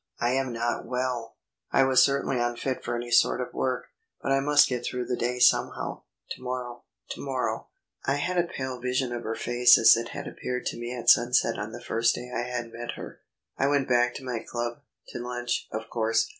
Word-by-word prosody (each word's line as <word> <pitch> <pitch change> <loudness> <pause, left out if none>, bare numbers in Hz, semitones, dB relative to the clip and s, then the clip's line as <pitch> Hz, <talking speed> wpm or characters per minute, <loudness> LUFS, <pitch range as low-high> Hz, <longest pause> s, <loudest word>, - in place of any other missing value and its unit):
"I 120 +1 +1
am 130 -1 0
not 120 0 -2
well." 125 -2 -2 0.4
I 135 - +5
was 130 -1 +5
certainly 140 -2 +2
unfit 120 +2 -2
for 120 - -2
any 120 0 -5
sort - - +4
of 125 - -4
work. 130 -1 -1 0.3
"But - - -2
I 135 - +4
must 145 +1 +5
get 125 -2 -3
through 125 0 -3
the 125 - -1
day 120 +1 -1
somehow." 125 - +2 0.3
To - - -6
morrow... 125 -1 -5 0.3
to - - -6
morrow.... 130 -2 -2 0.4
I 135 - +1
had 175 +5 0
a 175 - +1
pale 130 -1 -4
vision 125 0 -1
of 120 - -3
her 115 - -3
face 120 +1 +5
as 115 0 +8
it 115 +1 -3
had - - -6
appeared 125 0 -4
to - - -2
me 120 0 -5
at 120 -1 +4
sunset 120 -1 +3
on 105 +1 -4
the 120 +1 -9
first 115 0 +1
day 125 0 -7
I - - 0
had 120 -1 -4
met 120 +1 -5
her. - - -9 0.4
I 135 - +3
went 140 -1 +2
back 120 0 +2
to - - -7
my 125 -3 -2
club 120 +1 -4 0.3
to - - -6
lunch, 120 0 -3
of 110 +1 -5
course. 115 -1 +1
125 Hz, 215 wpm, -27 LUFS, 120-130 Hz, 0.4 s, as